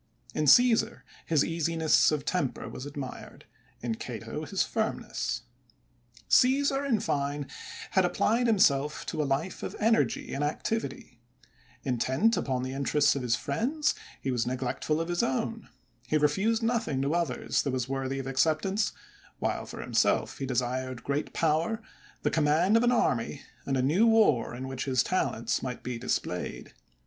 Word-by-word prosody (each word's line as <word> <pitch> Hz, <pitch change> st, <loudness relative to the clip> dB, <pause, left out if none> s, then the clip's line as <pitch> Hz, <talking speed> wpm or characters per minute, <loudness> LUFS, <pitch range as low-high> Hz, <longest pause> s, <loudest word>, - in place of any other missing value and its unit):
In 155 Hz, -, 0 dB
(^eesar, 240 Hz, -, +5 dB, 0.2 s
his 155 Hz, -4 st, +3 dB
easiness 165 Hz, -1 st, +3 dB
of 150 Hz, -2 st, -2 dB
temper 160 Hz, -9 st, -1 dB
was 130 Hz, +3 st, -7 dB
admired; 140 Hz, -3 st, -8 dB, 0.4 s
in 120 Hz, -2 st, -1 dB
Cato, -, -, -6 dB
his -, -, 0 dB
firmness. -, -, -2 dB, 0.8 s
Caesar, 275 Hz, +2 st, +4 dB
in 250 Hz, -6 st, +1 dB
fine, 145 Hz, -2 st, -1 dB, 0.5 s
had 190 Hz, -, +4 dB
applied 230 Hz, +7 st, +2 dB
himself 150 Hz, -9 st, +2 dB
to 155 Hz, -, -2 dB
a -, -, 0 dB
life 145 Hz, +7 st, -1 dB
of -, -, -5 dB
energy 225 Hz, +1 st, +1 dB
and 140 Hz, -, -1 dB
activity; 145 Hz, -, -3 dB, 0.6 s
intent 130 Hz, -, +2 dB
upon 130 Hz, -2 st, -1 dB
the 130 Hz, 0 st, -4 dB
interests 140 Hz, +2 st, +2 dB
of 140 Hz, -, -2 dB
his 120 Hz, -2 st, +1 dB
friends, 270 Hz, -, 0 dB, 0.3 s
he 135 Hz, -, -2 dB
was 120 Hz, -1 st, 0 dB
neglectful 130 Hz, +4 st, -1 dB
of 165 Hz, -, -2 dB
his 175 Hz, 0 st, 0 dB
own; 130 Hz, -, -2 dB, 0.4 s
he 155 Hz, -, +2 dB
refused 195 Hz, +10 st, +2 dB
nothing 225 Hz, -, 0 dB
to 140 Hz, -, 0 dB
otJiers 165 Hz, -5 st, 0 dB
that 140 Hz, -, -2 dB
was 130 Hz, -2 st, -1 dB
worthy 135 Hz, 0 st, -2 dB
of 135 Hz, -, -4 dB
acceptance, 160 Hz, +10 st, +1 dB, 0.4 s
while -, -, -2 dB
for -, -, -7 dB
himself -, -, +1 dB
he 135 Hz, -, -3 dB
desired 130 Hz, 0 st, -2 dB
great 140 Hz, +2 st, -2 dB
power, 165 Hz, +7 st, +1 dB, 0.4 s
the -, -, +1 dB
conunand 160 Hz, +6 st, +3 dB
of 230 Hz, -, +5 dB
an 245 Hz, -, +4 dB
army 135 Hz, -, 0 dB, 0.2 s
and 135 Hz, -1 st, +1 dB
a 130 Hz, -, +1 dB
new 175 Hz, -, +4 dB
war 210 Hz, -, +3 dB
in 130 Hz, +2 st, -5 dB
which 130 Hz, -1 st, -4 dB
his 130 Hz, -3 st, +2 dB
talents -, -, 0 dB
might -, -, -5 dB
be 125 Hz, -2 st, -4 dB
displayed. 125 Hz, -, -3 dB
150 Hz, 155 wpm, -28 LUFS, 130-195 Hz, 0.8 s, ^eesar